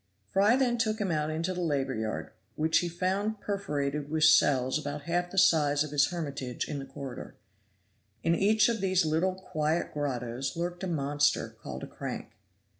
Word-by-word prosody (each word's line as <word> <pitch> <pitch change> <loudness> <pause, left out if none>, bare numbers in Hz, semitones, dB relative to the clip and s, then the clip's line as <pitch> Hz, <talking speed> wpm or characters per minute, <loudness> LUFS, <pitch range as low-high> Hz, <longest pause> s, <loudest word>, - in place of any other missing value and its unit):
Fry 200 - +3
then 250 -3 +1
took 220 -1 0
him 195 -4 0
out 150 -1 0
into 165 +4 -2
the 180 - -3
labor 140 -5 0
yard, 110 -1 -3 0.2
which 160 +1 +3
he 175 - -2
found 195 +5 -1
perforated 150 -8 -2
with 155 0 0
cells 135 -3 +5
about 145 0 -5
half 175 +2 -1
the 195 - -9
size 150 -5 +4
of 155 - -7
his 145 -1 +4
hermitage 140 -8 -4
in 145 - -4
the 135 - -6
corridor. 135 -2 -8 0.9
In 165 - +3
each 210 +4 +4
of 230 -3 -1
these 185 -3 +2
little 165 +4 +1
quiet 160 -3 -2
grottoes 130 -1 -3
lurked 175 +2 -3
a - - -1
monster, 145 -3 +1
called - - -8
a - - -5
crank. - - -6
160 Hz, 180 wpm, -29 LUFS, 145-185 Hz, 0.9 s, cells